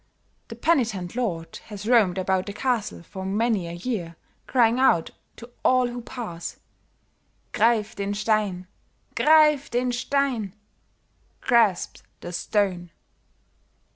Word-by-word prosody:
The - - -8
penitent 225 - 0
lord 170 -10 -3
has 210 -1 -8
roamed 215 -7 +4
about 185 0 0
the 200 - -5
castle 235 -7 -2
for 190 +2 -8
many 205 -1 0
a 170 - -6
year 175 -3 -4 0.3
crying 240 -1 +3
out 170 -11 +3 0.2
to 235 +1 -12
all 255 -1 +3
who 240 0 -6
pass, 220 -9 -7 0.9
'Grief 220 -1 +2
den 200 0 -3
Stein! 205 -4 0 0.5
Grief 300 -2 +4
den 245 +1 0
Stein!' 245 -5 -1 0.9
(Grasp 225 -7 +2 0.2
the 175 - -7
stone). 185 -2 -1
215 Hz, 115 wpm, -25 LUFS, 185-245 Hz, 0.9 s, roamed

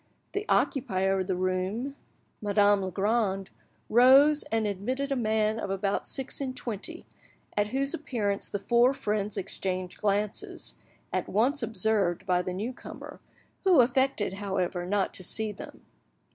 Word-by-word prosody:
The 405 +1 -3
occupier 195 -7 +1
of 185 - -2
the 190 - 0
room, 185 +9 -2 0.5
Madame 205 -1 +3
Legrand, 195 +1 0 0.4
rose, 270 +6 +6
and 225 -1 +1
admitted 250 +8 -2
a - - +2
man 220 -2 +1
of 200 - -4
about 195 +1 -1
six 270 +1 -4
and 260 -2 -3
twenty, 215 -6 -4 0.5
at 205 0 +2
whose 275 +4 0
appearance 215 -9 -2
the - - -2
four 240 +5 +3
friends 210 -3 -2
exchanged 185 -1 -4
glances, 205 0 -2 0.4
at - - -1
once 260 +8 +2
observed 205 -5 +1
by 180 -1 +2
the 180 - -4
new 210 +8 -3
comer, - - -10 0.4
who 370 -6 +5
affected, 250 -4 +2
however, 180 -3 -2
not 200 0 0
to 185 - -4
see 220 +4 +1
them. 200 - -11
210 Hz, 145 wpm, -28 LUFS, 195-245 Hz, 0.5 s, rose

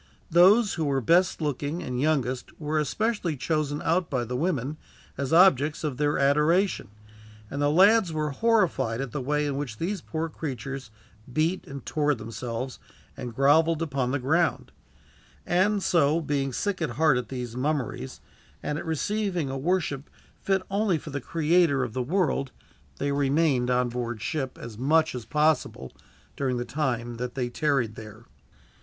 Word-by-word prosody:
Those 195 +6 +6
who 160 - -1
were 140 -2 +1
best 175 - +3
looking 150 +3 -2
and 125 -3 -3
youngest 130 -5 -1
were 155 0 -1
especially 180 - -1
chosen 150 +1 -1
out 170 +1 +1
by 125 -4 -1
the 125 +2 -4
women 150 -1 -1 0.4
as 140 -1 -3
objects 160 -4 +4
of 145 -5 -2
their 145 0 +1
adoration, 150 +8 +2 0.6
and 140 - -3
the 145 - +3
lads 195 +4 +5
were 155 -2 -1
horrified 160 - +1
at 135 -3 -4
the 145 - -3
way 150 +3 0
in 140 -2 -2
which 130 -7 -4
these 185 - -2
poor 160 +1 -3
creatures 135 -5 -6 0.4
beat 160 +7 0
and 140 0 -8
tore 150 -2 +1
themselves, 115 +3 -5 0.4
and 125 -3 -7
groveled 155 +4 +4
upon 135 -5 -1
the 135 - 0
ground; 160 +6 0 0.7
and 195 +3 +2
so, 160 -2 +3
being 140 -3 -1
sick 195 - -2
at 160 - 0
heart 155 -3 +4
at 120 -3 -7
these 125 -3 -5
mummeries, 130 - -3 0.4
and 150 +1 -2
at - - -7
receiving 180 -2 -1
a - - -4
worship 150 -2 -1 0.3
fit 190 -1 +1
only 200 -3 +2
for 150 - -9
the 145 0 -3
Creator 160 -2 +2
of 120 -4 -4
the 130 - -1
world, 145 -2 0 0.5
they 140 0 -1
remained 140 -2 +2
on 125 0 +2
board 120 -1 -4
ship, 140 0 -3
as 115 -2 -9
much 155 +4 +3
as 125 -3 -6
possible, 150 - 0 0.4
during 130 -3 -1
the 120 - -3
time 120 -5 -2
that 125 0 -5
they 125 -2 -1
tarried 135 -5 0
there. 110 +1 -11
145 Hz, 165 wpm, -26 LUFS, 130-165 Hz, 0.7 s, Those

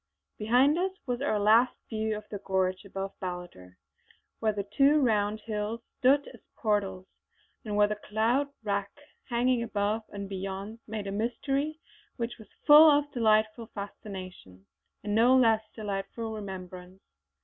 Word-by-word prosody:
Behind 255 +9 +3
us 375 +1 0
was 245 0 -2
our 280 -7 +1
last 220 +4 +4
view 220 -1 -2
of 215 - -8
the 205 - -4
gorge 190 0 -1
above 195 0 -5
Ballater, 175 - -7 0.6
where 220 -1 +2
the 200 -1 -3
two 285 +2 +5
round 215 -4 +1
hills 210 +1 -3 0.2
stood 275 +3 +4
as - - -15 0.2
portals, 200 -4 -1 0.6
and 210 -2 -4
where 205 0 +5
the 210 0 -3
cloud 230 +7 +2 0.2
rack 200 -1 -1 0.4
hanging 245 0 +2
above 215 -1 -1
and 200 -1 -6
beyond 195 +3 -5
made 215 -2 -4
a 195 - -4
mystery 270 +8 -2 0.4
which 235 -1 -4
was 215 - -14 0.2
full 300 +1 +10
of 290 0 +2
delightful 220 -1 +2
fascination 185 - -9 0.4
and 205 - -2
no 240 +4 +5
less 225 -3 +4
delightful 215 +2 -4
remembrance. 185 -3 -8
215 Hz, 145 wpm, -29 LUFS, 200-240 Hz, 0.6 s, full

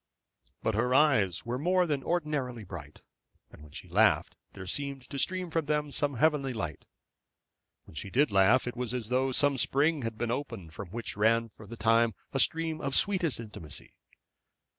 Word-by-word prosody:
But 110 - +1
her 125 +4 +1
eyes 120 - +3
were 120 +2 -3
more 180 +4 +2
than 145 -5 -1
ordinarily 150 -9 -2
bright, 85 -6 -10 0.5
and - - -15
when 75 -1 -14
she - - -9
laughed - - +3 0.2
there 95 - -8
seemed 140 +4 -3
to 140 - -3
stream 185 0 0
from 160 -2 -1
them 150 -1 0
some 145 -1 -1
heavenly 140 -1 +2
delight. 85 - -5 1.0
When - - -16
she 95 +5 -5
did 140 +5 +2
laugh 100 +6 +4
it 125 - -4
was 125 0 -3
as 115 -3 -4
though 130 +1 +1
some 140 +1 +2
spring 145 +5 +2
had 115 -2 -4
been 120 0 -2
opened 115 - -5
from 95 +1 -8
which 115 +4 -5
ran 115 +2 +2
for 105 0 -14
the 115 - -9
time 115 0 +3 0.2
a 135 - 0
stream 160 +1 +2
of 140 -1 -1
sweetest 180 -9 +3
intimacy. 105 -10 -8
125 Hz, 185 wpm, -29 LUFS, 110-145 Hz, 1.0 s, laugh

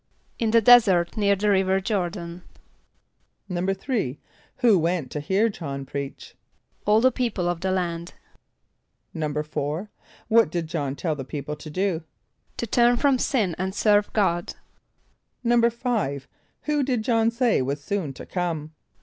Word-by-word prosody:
=In 230 - +1
the 230 +1 +5
desert 205 -7 +6
near 200 -2 +3
the 205 +2 +1
river 190 0 +2
Jôr´dan.= 180 -4 -3 1.1
=3.= 190 - -1 0.4
Who 235 -7 +4
went 165 -5 -1
to 150 - -3
hear 190 +9 +2
J[)o]hn 140 -10 -5
preach? 140 0 -6 0.5
=All 215 +1 +5
the 260 +1 +5
people 230 -8 -1
of 175 -1 -2
the 190 - -1
land.= 175 -2 -2 1.0
=4.= 150 +3 -3 0.4
What 225 -6 +4
did 170 0 -2
J[)o]hn 145 -4 -3
tell 160 +3 -1
the 135 - -5
people 145 +2 -5
to 155 - -9
do? 180 0 -1 0.5
=To - - -2
turn 240 +2 +3
from 275 -1 +3
sin 215 -12 +1
and 190 +1 -2
serve 205 -1 +3
God.= 175 -5 0 0.9
=5.= 235 - +1 0.4
Who 300 -1 +1
did 255 -5 0
J[)o]hn 225 -1 +2
say 235 - +2
was 140 +3 -3
soon 190 -7 -2
to - - -10
come? 165 -4 -3
190 Hz, 140 wpm, -24 LUFS, 160-225 Hz, 1.1 s, desert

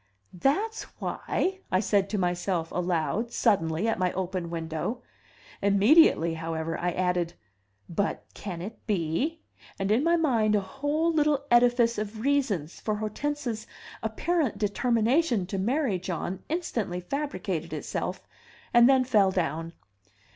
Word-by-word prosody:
"That's 390 - 0 0.2
why!" 380 +1 -2
I 185 - +3
said 200 -1 +1
to 210 - -1
myself 175 -2 -1
aloud, 180 +5 -1
suddenly, 185 -5 +1
at 225 - 0
my 180 -1 +2
open 185 -2 -3
window. 165 +8 -3 0.6
Immediately, 200 - +5
however, 165 0 -3
I 180 - -1
added, 180 -1 0 0.5
"but 200 +4 -2
can 175 -4 -6
it 220 +4 -7
be?" 210 - -1 0.4
And 195 +1 -1
in 235 +6 +3
my 335 +1 +4
mind 235 -10 +2
a - - +4
whole 290 - -1
little 295 -2 +2
edifice 240 -1 +4
of 215 +1 -5
reasons 235 - 0
for 215 - -1
Hortense's 225 +2 -3 0.3
apparent 265 - 0
determination 230 - +2
to 195 +1 -3
marry 235 -1 +1
John 180 +1 -4
instantly 235 - -2
fabricated 185 - -3
itself - - -4 0.5
and 240 +1 +7
then 265 -1 +5
fell 215 -6 +4
down. 165 -3 -2
210 Hz, 130 wpm, -27 LUFS, 180-260 Hz, 0.6 s, and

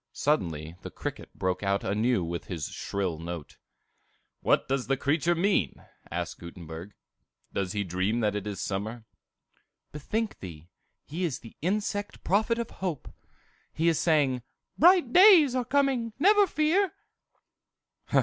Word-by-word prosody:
Suddenly 85 - -1
the - - -7
cricket - - -6
broke 95 -1 -1
out 100 -1 0
anew 105 +1 +1
with 85 0 -4
his 80 -5 -4
shrill 95 -5 -3
note. 85 -2 -7 0.8
"What - - +2
does 135 -1 -1
the 135 - +1
creature 155 +5 +1
mean?" 170 - 0 0.2
asked - - -4
Gutenberg. 85 +2 -9 0.6
"Does 95 -2 -2
he 105 -1 -1
dream 95 +5 -1
that 105 -2 +1
it 105 0 -3
is 100 -2 -4
summer?" 110 +4 -4 0.9
"Bethink 215 +9 -3
thee; 85 -3 -10 0.4
he 165 +5 -4
is 160 -7 -2
the 115 - -13
insect 205 +3 -2
prophet 220 +5 +2
of 235 -1 -4
hope. 180 -7 -5 0.6
He 165 +2 0
is 165 - +1
saying, 145 -6 +2 0.3
'Bright 340 -6 +5
days 360 - +8
are 255 -1 0
coming, 260 -4 +1
never 405 +6 +5
fear! 335 +5 +2
135 Hz, 140 wpm, -28 LUFS, -, 0.9 s, days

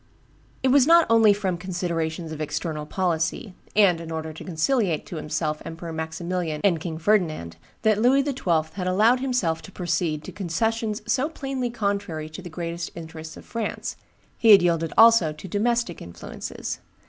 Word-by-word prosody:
It 265 - +3
was 275 0 +5
not 335 0 +7
only 225 -2 +6
from 195 -4 -1
considerations 170 -3 -3
of 155 -1 -6
external 150 0 -3
policy, 175 +2 -1 0.2
and 190 -5 +4
in 165 - -8
order 160 0 -4
to 155 - -9
conciliate 180 - 0
to 170 - -7
himself 155 0 -2
Emperor 165 0 -7
Maximilian 160 0 -3
and 180 -5 +3
King 160 -1 -5
Ferdinand, 160 - 0 0.3
that 215 -2 +3
Louis 265 +4 +4
XII. 180 - 0
had 185 -1 -3
allowed 215 +7 +4
himself 245 -12 0
to - - -12
proceed 165 -4 -1
to - - -8
concessions 215 +4 -1
so 255 +6 +1
plainly 270 -5 -3
contrary 200 -8 -2
to 155 +4 -9
the 180 - -8
greatest 170 0 -4
interests 160 -1 -8
of - - -12
France: 230 -3 -4 0.4
he 230 - +4
had 200 -4 +9
yielded 165 -2 +1
also 225 -7 +7
to 155 +5 -10
domestic 225 0 0
influences. 85 0 -6
180 Hz, 165 wpm, -24 LUFS, 160-220 Hz, 0.4 s, had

